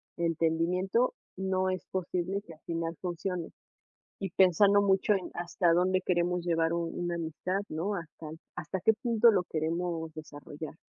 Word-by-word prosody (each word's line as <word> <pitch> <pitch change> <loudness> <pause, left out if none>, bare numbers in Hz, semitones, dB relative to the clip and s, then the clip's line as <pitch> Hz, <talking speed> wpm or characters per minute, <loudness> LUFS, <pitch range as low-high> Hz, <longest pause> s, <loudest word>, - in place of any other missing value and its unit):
entendimiento, 170 +7 +1 0.2
no 190 0 0
es 185 -2 -2
posible 185 +1 -2
que 170 -5 -12
al 155 - -19
final 165 0 -2
funcione. 180 -1 -3 0.7
Y 195 -2 -3
pensando 195 +3 +5
mucho 195 +1 +3
en 190 -3 -3
hasta 175 0 +1
dónde 185 +2 +3
queremos 175 -1 0
llevar 165 -1 +1
un 170 0 -2
una 175 0 -1
amistad, 170 +4 -2
¿no? 180 +7 -2
Hasta 165 -3 -7 0.3
hasta 190 - -3
qué 220 - +5
punto 230 +1 +4
lo 185 -4 +2
queremos 165 0 -2
desarrollar. 150 0 -8
175 Hz, 150 wpm, -30 LUFS, 165-190 Hz, 0.7 s, pensando